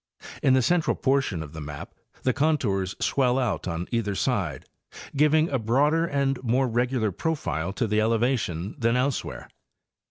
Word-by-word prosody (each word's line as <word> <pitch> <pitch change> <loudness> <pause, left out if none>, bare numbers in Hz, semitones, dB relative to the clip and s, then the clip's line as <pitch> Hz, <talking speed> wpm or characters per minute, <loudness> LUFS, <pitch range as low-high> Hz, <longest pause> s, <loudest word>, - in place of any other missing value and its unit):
In 130 -1 +4
the 130 - +3
central 175 +5 +2
portion 135 - 0
of 75 -1 -11
the 80 - -7
map 75 0 -8 0.3
the 130 - +2
con 155 +3 +2
tours 95 -7 -1
swell 130 -2 +2
out 110 - -1
on 85 0 -3
either 110 -4 -1
side, - - -1 0.5
giving 150 +2 +4
a 135 - 0
broader 145 +9 +2
and 140 -3 0
more 130 +2 +1
regular 120 -2 0
profile 90 - -2
to 120 - -1
the 105 0 +1
elevation 110 -6 0
than 115 0 +2
elsewhere. 130 +1 -2
120 Hz, 160 wpm, -26 LUFS, 100-135 Hz, 0.5 s, In